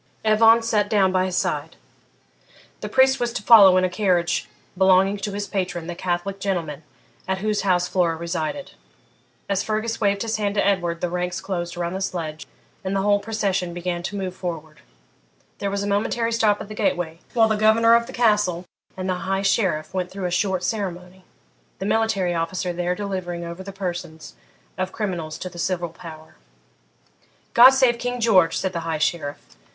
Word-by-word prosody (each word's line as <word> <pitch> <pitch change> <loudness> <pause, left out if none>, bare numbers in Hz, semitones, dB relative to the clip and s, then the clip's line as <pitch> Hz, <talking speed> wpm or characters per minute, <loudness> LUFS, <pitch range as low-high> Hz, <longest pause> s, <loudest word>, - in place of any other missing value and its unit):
Evan 225 +1 +5
sat 210 -3 +1
down 200 -4 +3
by 185 0 +1
his 185 -1 -3
side. - - -2 1.0
The - - -6
priest 265 0 +4
was 240 -1 -1
to 220 - -4
follow 200 -5 +8
in 185 - +3
a - - +3
carriage 180 -2 0 0.3
belonging 190 +1 +4
to 205 +1 -4
his 205 0 -3
patron, 180 -4 -3
the 175 - -5
Catholic 180 +2 -3
gentleman 170 -7 -3 0.5
at 190 0 0
whose 210 +1 -1
house 180 -2 +1
Flora 175 -3 +1
resided. 170 - -4 0.8
As 195 -1 0
Fergus 220 +1 -2
waved 200 0 +1
his 225 -1 -2
hand 205 -1 -1
to 205 - +2
Edward 175 -4 0
the 180 - -1
ranks 180 +1 -2
closed 175 -3 -4
around 175 0 -2
the 190 - -4
sledge, 160 -5 -4 0.4
and 190 +1 -2
the 195 - 0
whole 205 0 +3
procession 200 -5 -2
began 175 0 -3
to 190 +3 -5
move 190 -2 -4
forward. 160 -4 -6 0.8
There 200 - -2
was 200 0 -2
a - - -3
momentary 225 +3 0
stop 215 -3 +2
at - - -7
the 215 - -8
gateway, 175 -5 -1 0.2
while 225 -2 +5
the 220 - +1
governor 220 +2 +4
of 235 0 +3
the - - -8
Castle 210 -7 +1 0.3
and 185 0 -4
the 185 0 -3
High 195 0 0
Sheriff 190 -6 0
went 180 -1 -2
through 195 -1 -6
a 180 - -2
short 190 0 0
ceremony, 185 -3 -4 0.5
the 190 - -5
military 205 -4 +1
officer 175 +2 -2
there 175 +1 -1
delivering 180 -3 -4
over 170 +2 -7
the 195 +1 -8
persons 175 -4 -6 0.5
of 185 - 0
the - - -20
criminals 175 -7 -3
to - - -6
the 175 -1 -10
civil 175 -1 -1
power. 160 -1 -12 1.2
'God 245 +2 +10
save 260 -3 +3
King 245 0 -3
George!' 185 -8 +4
said 190 -1 -2
the 170 - -2
High 165 -1 -3
Sheriff. 150 -2 -1
190 Hz, 190 wpm, -23 LUFS, 175-210 Hz, 1.2 s, God